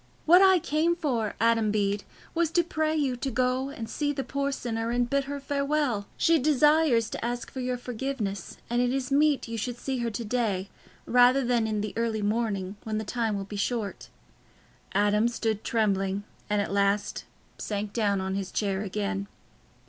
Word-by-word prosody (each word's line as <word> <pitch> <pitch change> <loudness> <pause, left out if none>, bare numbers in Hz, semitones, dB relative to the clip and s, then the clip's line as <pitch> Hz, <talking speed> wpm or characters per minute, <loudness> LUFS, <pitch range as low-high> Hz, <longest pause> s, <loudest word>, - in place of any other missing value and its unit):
What 355 +4 +7
I 380 -1 +7
came 325 +1 +1
for, 245 -10 -1
Adam 225 -1 +3
Bede, 205 -1 0 0.3
was 335 -1 +1
to 345 - +4
pray 315 -2 -1
you 280 -5 +1
to 270 - -2
go 255 +2 0
and 230 -5 -6
see 290 +5 -1
the 275 -2 -3
poor 280 +1 -2
sinner 230 -3 -3
and 240 0 +1
bid 275 +2 0
her 285 +1 -4
farewell. 280 -6 0
She 330 -1 +4
desires 295 -4 +4
to - - -5
ask 240 +1 -3
your 255 -1 -2
forgiveness, 240 -6 -4
and 240 +1 +1
it 245 0 +2
is 265 0 -2
meet 290 -1 +3
you 230 0 -4
should 245 +2 -3
see 265 +1 -3
her 235 -1 -1
to 230 +1 -5
day, 205 -5 -1 0.3
rather 250 +2 +5
than 240 -2 +2
in 215 -1 -1
the 210 -1 -4
early 225 -2 -1
morning, 205 -3 -1
when 215 -1 -2
the 220 - -2
time 225 -2 -1
will 195 - -4
be 205 +1 -7
short." 205 -1 -2 0.9
Adam 205 +2 +3
stood 225 -3 -2
trembling, 200 -3 0 0.3
and 210 -1 +2
at 200 - -5
last 200 +1 +1 0.3
sank 205 -1 -3
down 205 -4 +1
on 190 0 -2
his 195 -1 -3
chair 195 -2 -1
again. 200 0 -2
235 Hz, 185 wpm, -27 LUFS, 210-270 Hz, 0.9 s, What